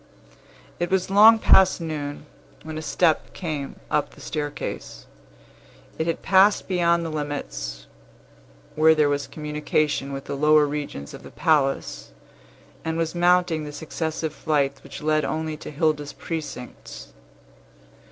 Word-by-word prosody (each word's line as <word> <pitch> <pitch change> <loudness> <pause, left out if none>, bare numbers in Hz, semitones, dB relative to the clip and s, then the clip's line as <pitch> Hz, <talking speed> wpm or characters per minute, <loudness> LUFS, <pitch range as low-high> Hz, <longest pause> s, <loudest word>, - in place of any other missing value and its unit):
It 175 - -1
was 190 0 0
long 215 +3 +8
past 190 -4 +5
noon, 150 -3 -5 0.4
when 155 0 -7
a 155 - -4
step 160 0 +1
came 150 -6 -4 0.2
up 150 - 0
the - - -16
staircase. 145 -2 -5 0.9
It 160 - 0
had 165 - -2
passed 195 +2 +4
beyond 170 -2 +2
the 165 - -4
limits 60 - -5 0.9
where 160 +1 +5
there 150 -2 +3
was 140 -1 -1
communication 150 -1 -1
with 135 0 -5
the - - -5
lower 150 +1 +5
regions 145 - -5
of - - -9
the - - -11
palace, 135 - 0 0.7
and 160 0 -2
was 165 -1 -1
mounting 175 -2 +2
the 150 - -6
successive 160 +1 -4
flights 140 -4 0
which - - -10
led 155 0 +2
only 155 0 -2
to - - -9
Hilda's 150 -1 -1
precincts. 155 - -7
155 Hz, 135 wpm, -24 LUFS, 145-165 Hz, 0.9 s, long